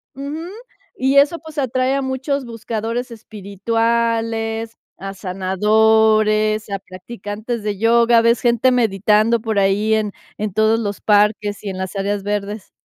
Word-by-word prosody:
Ujú, 290 +5 -6 0.5
y 270 -4 0
eso, 295 +4 +4
pues 315 -1 -13
atrae 260 0 0
a 275 - 0
muchos 265 +1 -2
buscadores 230 +1 -4
espirituales, 225 +1 -2 0.2
a 195 +1 -7
sanadores, 215 +3 +2
a 200 - -2
practicantes 205 +4 -7
de 205 -2 -3
yoga, 235 +1 +4
ves 230 0 +3
gente 240 +1 +3
meditando 220 0 +2
por 220 -2 -2
ahí 200 +3 +2
en 210 -2 -1 0.3
en 210 -3 -3
todos 220 +1 +2
los 205 -3 -4
parques 210 0 +1
y 205 - -4
en 190 -1 -6
las 190 +1 -5
áreas 200 +1 -1
verdes. 205 0 -4
220 Hz, 140 wpm, -19 LUFS, 205-235 Hz, 0.5 s, eso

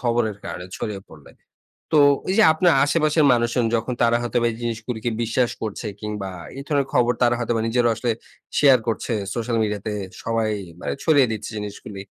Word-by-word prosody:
খবরের 115 -4 0
কারণে 90 - -6
ছড়িয়ে 105 -3 -4
পড়লে। 75 -3 -15 0.6
তো 150 - +6 0.3
এই 190 - +1
যে 220 - +7
আপনার 170 +1 +3
আশেপাশের 155 0 +2
মানুষজন 120 0 +1
যখন 115 +2 -1
তারা 120 0 +4
হয়তো 120 0 -1
বা 120 - +3
এই - - -7
জিনিসগুলিকে 115 0 -3
বিশ্বাস 120 +1 +1
করছে, 110 0 -4
কিংবা 105 -2 -4 0.3
এই - - -5
ধরনের 140 -3 +1
খবর 120 -1 +4
তারা 120 0 +4
হয়তোবা 115 -1 0
নিজেরাও 120 0 +2
আসলে 120 +1 -1 0.5
শেয়ার 135 -4 +6
করছে 115 +1 -1 0.2
সোশ্যাল 115 0 -1
মিডিয়া 105 -2 -1
তে 105 - -2 0.3
সবাই 115 -1 0 0.3
মানে - - -3
ছড়িয়ে 145 -5 +5
দিচ্ছে 110 - -4
জিনিসগুলি। 105 -1 -7
120 Hz, 180 wpm, -22 LUFS, 110-125 Hz, 0.6 s, যে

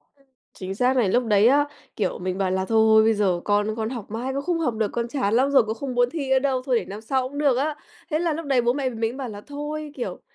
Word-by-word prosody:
Ừm, 275 -1 -30 0.3
chính 190 +1 -6
xác 255 +3 +2
này, 215 -6 +3
lúc 245 +4 +2
đấy 210 0 +4
á, 290 +3 +4 0.3
kiểu, 195 -4 -2
mình 185 +1 -3
bảo 190 -2 0
là 190 0 0
thôi, 225 +1 +1 0.2
thôi, 220 - +7
bây 225 0 +4
giờ 190 -4 +1
con 210 +1 +1
con 220 0 -2
học 235 -5 -7
mãi 245 +4 -3
cũng 275 - -2
không 345 -1 -1
học 250 -8 0
được, 215 -2 -1
con 235 0 -2
chán 235 -6 -1
lắm 260 +4 +3
rồi 270 -4 +5
cũng 220 +1 -4
không 255 0 -5
muốn 245 0 +3
thi 280 -3 -4
nữa 265 0 +4
đâu, 260 -2 0
thôi 250 -4 +2
để - - -7
năm 205 +2 -8
sau 255 +2 -1
cũng 285 - -9
được 280 -4 +2
á. 295 +2 0 0.3
Thế 310 - 0
là 335 -2 0
lúc 325 +1 -5
đấy 265 -3 +2
bố 240 +1 +2
mẹ 270 -2 -1
mình 230 - -8
mới 225 +1 0
bảo 260 -2 -5
là 205 -1 -8
thôi, 295 +2 -6
kiểu, 200 -9 -5
245 Hz, 300 wpm, -24 LUFS, 215-275 Hz, 0.3 s, thôi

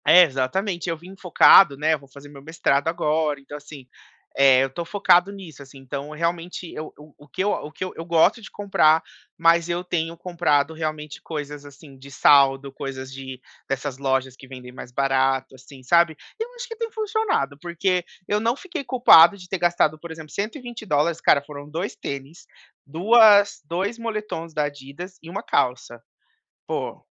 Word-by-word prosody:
Exatamente, 175 +3 +3
eu 165 - -2
vim 180 +4 -13
focado, 180 -4 +6
né, 155 +2 +1
eu 155 - -2
vou 140 - -18
fazer 140 +1 -14
meu 145 -1 -13
mestrado 150 -1 0
agora, 155 -2 0
então 140 +1 -11
assim, 145 -3 -11 0.5
eh, 135 -1 +5
eu - - 0
estou 135 +6 -6
focado 180 +1 +3
nisso, 185 -8 -11
assim, 140 0 -14
então 140 +2 -7
realmente 170 +2 -4
eu 155 0 -7
eu 150 0 -16
o 145 - -17
que 185 - -3
eu 205 - +1
o 150 -6 -4
que 185 - -5
eu 165 -3 -8
gosto 170 +7 +3
de - - -11
comprar, 165 -6 +2 0.3
mas 170 +1 +3
eu 175 +1 -2
tenho 165 -2 -3
comprado 160 -4 0
realmente 155 -2 -5
coisas 145 -2 -7
assim 140 -1 -15
de 140 +1 -13
saldo, 140 0 +4
coisas 135 -1 -7
de 130 -1 -8 0.3
dessas 135 0 -4
lojas 130 -1 -1
que 135 - -15
vendem 125 -1 -11
mais 125 -1 -11
barato, 135 0 0
assim, 130 +1 -15
sabe. 170 +2 +3 0.2
Eu 450 - -3
acho 485 +1 -7
que 455 - -8
tem 460 0 -3
funcionado, 430 - -1
porque 180 +1 -1 0.2
eu 210 - +1
não 230 +3 0
fiquei 345 -1 -7
culpado 200 -9 +6
de 180 -2 -13
ter 190 0 -4
gastado 170 -3 +1
por 170 - -10
exemplo 160 -2 -10
U$120 205 - -2
cara, 140 - +4
foram 145 0 -10
2 170 +6 -4
tênis, 140 +4 -8 0.4
duas 205 +5 +5
2 190 +9 -3
moletons 215 -7 -5
da 150 -1 -1
Adidas 145 +6 -8
e 165 - -12
1 200 +5 -5
calça. 125 - -1 0.7
Pô, - - -5
160 Hz, 175 wpm, -23 LUFS, 140-180 Hz, 0.7 s, focado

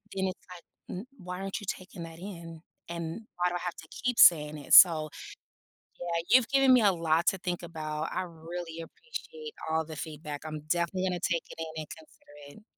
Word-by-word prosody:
then 190 0 0
it's, 185 - -5
like, 175 - -12 0.4
"Mm, 215 - -8
why 180 0 -7
aren't 195 +3 -3
you 205 - -9
taking 185 -1 -6
that 165 0 -10
in, 170 -4 -8 0.3
and 170 +4 -4 0.2
why 180 0 +2
do 175 - -4
I - - -1
have 180 -1 -4
to 160 - -12
keep 250 -1 -2
saying 150 -3 +7
it?" 145 - -4
so 155 -4 +9 0.9
yeah, 170 -1 -1
you've 250 -2 +6
given 270 -1 +5
me 250 - +6
a 200 -2 +5
lot 165 -1 +1
to 195 - +3
think 175 -1 -3
about, 155 -2 -4
I - - -1
really 165 0 -7
appreciate 460 - -8 0.2
all 160 0 +1
the 155 -1 -8
feedback, 150 -1 -6
I'm 155 -1 -5
definitely 175 +4 0
gonna 180 -1 -2
take 170 -1 0
it - - -11
in 160 -1 -5
and 150 - -8
consider 145 0 -14
it. - - -23
170 Hz, 205 wpm, -29 LUFS, 160-185 Hz, 0.9 s, so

